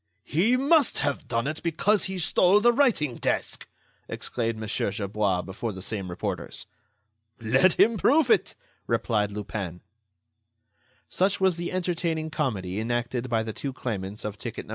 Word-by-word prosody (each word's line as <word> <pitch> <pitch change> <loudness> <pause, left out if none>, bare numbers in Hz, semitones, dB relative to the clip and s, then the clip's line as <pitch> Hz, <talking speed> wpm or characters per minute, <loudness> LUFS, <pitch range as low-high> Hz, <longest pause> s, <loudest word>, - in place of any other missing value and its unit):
"He 215 +11 +2
must 280 +1 +3
have 145 - -1
done 115 +1 -1
it, 155 +2 -3
because 190 +5 +2
he 190 0 -4
stole 180 +3 +4
the 240 +3 +4
writing 225 - +2
desk!" - - -2 0.4
exclaimed 115 -2 -3
Mon. 110 0 -5
Gerbois 100 -2 -1
before 110 +4 -4
the 95 - -8
same 100 -3 -4
reporters. 85 - -4 0.7
"Let 130 +11 +3
him 225 +1 +5
prove 275 +4 +4
it!" - - +2 0.3
replied 105 -3 +1
Lupin. 100 -4 -5 1.3
Such 190 +2 +1
was 190 -3 +3
the 175 0 -3
entertaining 170 -3 -1
comedy 105 - -2
enacted 120 +2 -2
by 115 -1 +1
the 110 -1 -5
two 135 +4 -4
claimants 105 -5 -5
of 105 -1 -5
ticket - - -6
No. - - -19
125 Hz, 150 wpm, -26 LUFS, -, 1.3 s, him